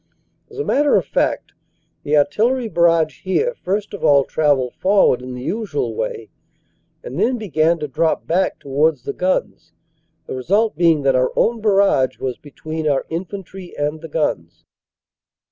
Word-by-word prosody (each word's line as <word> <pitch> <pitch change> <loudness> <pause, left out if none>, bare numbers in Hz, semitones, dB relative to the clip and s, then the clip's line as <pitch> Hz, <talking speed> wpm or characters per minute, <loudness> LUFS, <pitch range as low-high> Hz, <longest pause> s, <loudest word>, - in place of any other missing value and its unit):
As 430 - -14
a 430 - -2
matter 290 +1 +3
of - - +2
fact, - - -1 0.5
the 150 +1 +1
artillery 230 - +1
barrage 165 - +2
here 445 - 0
first 205 - -3
of 205 - -7
all 140 -1 +5
travelled 140 -4 +1
forward 195 -9 +3
in 125 0 -7
the 125 - -7
usual 225 - -2
way - - -5 0.7
and 485 - -6
then 250 +1 +2
began 165 - +1
to 150 -2 -4
drop 160 +4 0
back 180 +3 0
towards 145 0 0
the - - -4
guns 185 +1 -2 0.5
the - - -6
result 200 - +1
being 165 -4 +3
that 135 -1 +3
our 130 0 +2
own 230 -1 +1
barrage 195 -11 +2
was 130 -2 -4
between 155 +2 -6
our 140 -2 0
infantry 185 +1 -7
and 150 +2 -2
the 165 - -9
guns. 85 - -2
165 Hz, 160 wpm, -19 LUFS, 145-205 Hz, 0.7 s, all